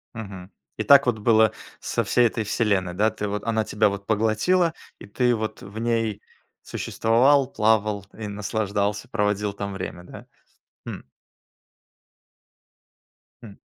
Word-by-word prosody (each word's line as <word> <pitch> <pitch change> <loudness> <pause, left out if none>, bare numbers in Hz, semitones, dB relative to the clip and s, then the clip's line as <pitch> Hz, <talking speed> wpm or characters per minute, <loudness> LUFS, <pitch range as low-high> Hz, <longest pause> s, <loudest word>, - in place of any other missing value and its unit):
Мгм. 100 -4 -8 0.3
И - - -1
так 140 0 +7
вот 120 -3 0
было 110 -1 +4 0.3
со - - -1
всей 120 -1 +3
"Этой 115 0 -3
вселенной", 100 -4 0
да? 105 +5 +2
Ты 105 -1 -4
вот 105 0 -3
Она 110 -1 0
тебя 105 0 +2
вот 100 0 -6
поглотила, 115 - +2 0.3
и - - -10
ты 120 +4 +1
вот 110 -1 -4
в 100 +3 -8
ней 115 -3 -1 0.4
существовал, 130 +5 +2
плавал 105 -2 +1
и 110 -2 -5
наслаждался, 105 0 -2
проводил 105 -1 -1
там 100 0 -5
время. 90 -2 -6
Да? - - -12 0.6
Хм. - - -6 2.4
Хм. 105 -4 -10
110 Hz, 135 wpm, -24 LUFS, 100-115 Hz, 2.4 s, так